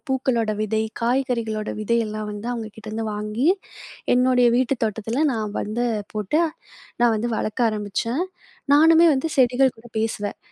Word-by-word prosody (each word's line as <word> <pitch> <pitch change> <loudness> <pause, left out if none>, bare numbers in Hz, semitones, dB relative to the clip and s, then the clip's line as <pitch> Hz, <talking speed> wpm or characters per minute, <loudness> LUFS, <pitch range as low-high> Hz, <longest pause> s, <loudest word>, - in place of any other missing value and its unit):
பூக்களோட 255 -4 0
விதை, 220 +1 0 0.2
காய்கறிகளோட 235 -3 -1
விதையெல்லாம் 215 -1 -1
வந்து 210 +2 -7
அவங்க 225 -2 -4
கிட்டருந்து 220 +1 -5
வாங்கி, 210 +6 -2 0.7
என்னுடைய 250 -1 +4
வீட்டுத் 260 0 0
தோட்டத்துல 225 +5 -1
நான் 215 -2 -2
வந்து 230 +4 -2 0.3
போட்டு, 215 - 0 0.6
நான் 240 -1 +5
வந்து 235 +3 -1
வளர்க்க 230 +2 0
ஆரம்பிச்சேன். 215 - -2 0.5
நானுமே 325 +2 +7
வந்து 270 +5 -1
செடிகள் 255 0 +4
கூட 235 +2 -15
பேசுவேன். 215 -2 -2
230 Hz, 130 wpm, -23 LUFS, 215-255 Hz, 0.7 s, நானுமே